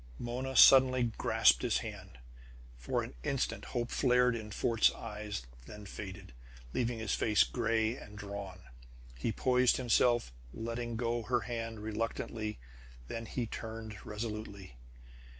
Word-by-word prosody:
Mona 125 - -4
suddenly 130 -2 +8
grasped - - +4
his - - +1
hand. 60 - -9 0.6
For - - -1
an - - -8
instant - - -2
hope 120 0 -3
flared 125 -2 +3
in 110 -2 -6
Fort's 115 +2 +3
eyes, 105 - -6 0.2
then 105 -1 -10
faded, 95 -4 -8 0.4
leaving 120 -1 0
his 110 -1 -2
face 105 -1 +4
gray 115 -1 0
and 105 -4 -11
drawn. 100 -2 -7 0.5
He 60 - -2
poised 125 +3 +3
hiself, 120 - +2 0.2
letting 115 +1 -4
go 120 0 -1
her 120 +1 0
hand 115 -1 -5
reluctantly. 110 0 -3 0.5
Then 115 0 -5
he 120 +1 -2
turned 110 -2 -7
resolutely. 105 - -6
115 Hz, 130 wpm, -33 LUFS, 105-120 Hz, 0.6 s, suddenly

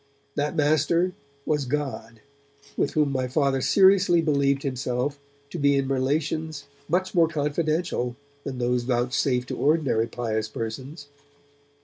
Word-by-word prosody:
That 150 +2 -1
master 155 +4 +2 0.3
was 150 -3 0
God, 125 -5 -4 0.5
with - - 0
whom 150 -2 +2
my 130 -1 -1
Father 135 0 +1
seriously 185 +5 +5
believed 140 -3 +1
himself 130 +1 -2 0.3
to - - -5
be 140 -1 +3
in 135 -1 0
relations 145 +3 -1 0.3
much 185 +3 0
more 170 -3 +4
confidential 155 -3 -1 0.3
than 130 -2 -5
those 125 0 +1
vouchsafed 125 +1 0
to - - -4
ordinary 140 -7 +2
pious 110 -3 -2
persons. 130 +8 -6
140 Hz, 125 wpm, -25 LUFS, 125-155 Hz, 0.5 s, seriously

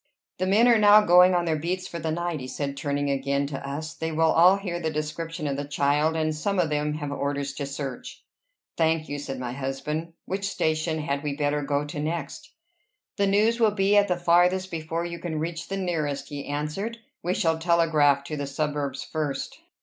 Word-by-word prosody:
"The 185 - 0
men 215 +5 +5
are 235 -2 +5
now 210 0 +8
going 180 0 +7
on 175 -1 +1
their 160 -2 0
beats 180 +4 -2
for 170 - -6
the 160 0 -3
night," 170 0 -2
he 130 - -6
said, 140 +1 -4
turning 145 0 -1
again 140 +1 0
to 140 -1 -5
us. 155 +3 -5
"They 160 0 -4
will 160 0 +3
all 180 +4 +6
hear 180 -3 -4
the 160 -2 -1
description 155 +2 -4
of 140 -1 -1
the 145 - -2
child, 145 +2 +1
and 155 -1 0
some 200 +6 -1
of 170 -4 +1
them 150 0 0
have 145 -2 -4
orders 140 -1 -2
to 140 0 -4
search." 135 -2 -6 0.5
"Thank 160 -1 +1
you," 145 - -3
said 135 -2 -5
my 125 -1 -4
husband. 140 +5 -4
"Which 195 +1 -3
station 160 -2 -1
had 140 -1 -2
we 145 -2 -3
better 145 0 0
go 145 +1 -1
to 145 0 -6
next?" 165 - -4 0.7
"The 200 -1 +2
news 215 +4 +3
will 225 -2 +5
be 200 0 +2
at 205 0 +5
the 180 -2 0
farthest 180 +2 +3
before 165 +1 -3
you 170 0 -5
can 165 -3 -4
reach 165 +2 -4
the 195 - -3
nearest," 160 -7 -2
he 145 -2 -6
answered. 150 +11 -3 0.2
"We 180 +2 -1
shall 165 -5 +1
telegraph 160 -4 +3
to 150 +2 -5
the 140 -1 -3
suburbs 145 -1 -2
first." 150 -4 -3
155 Hz, 210 wpm, -26 LUFS, 145-175 Hz, 0.7 s, now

